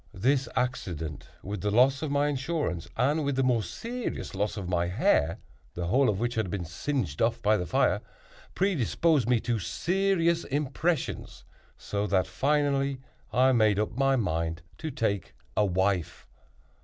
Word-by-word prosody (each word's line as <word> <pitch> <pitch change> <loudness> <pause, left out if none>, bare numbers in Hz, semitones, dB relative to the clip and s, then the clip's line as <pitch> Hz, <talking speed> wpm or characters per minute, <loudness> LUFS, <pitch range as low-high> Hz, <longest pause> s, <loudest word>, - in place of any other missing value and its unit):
This 130 +7 +1
accident, 85 - -3 0.2
with 100 -1 -5
the 105 - 0
loss 130 +5 +4
of 155 - -2
my 145 +1 +2
insurance, 135 - -2
and 145 +6 +2
with 140 -1 0
the 135 - +2
more 125 -3 +3
serious 240 - -5
loss 100 +3 -1
of 95 -3 -4
my 85 -1 +1
hair, 85 -3 +2 0.4
the 85 - -3
whole 130 +9 +3
of 100 -2 0
which 120 +1 -1
had 110 -4 -1
been 90 -2 -3
singed 90 - -3
off 115 +1 +2
by 105 +1 +4
the 90 -4 -2
fire, - - +2 0.5
predisposed 160 - +2
me 125 -2 +4
to 120 -2 -1
serious 170 - +1
impressions, 145 +3 -2 0.3
so 100 0 -2
that, 95 -1 +2
finally, 140 -1 +1 0.3
I 130 +2 +4
made 110 -5 +3
up 105 0 0
my 135 +1 +3
mind 80 -7 -1 0.2
to 160 - -3
take 100 - -2 0.2
a 105 - +3
wife. 95 -1 0
120 Hz, 160 wpm, -28 LUFS, 95-140 Hz, 0.5 s, loss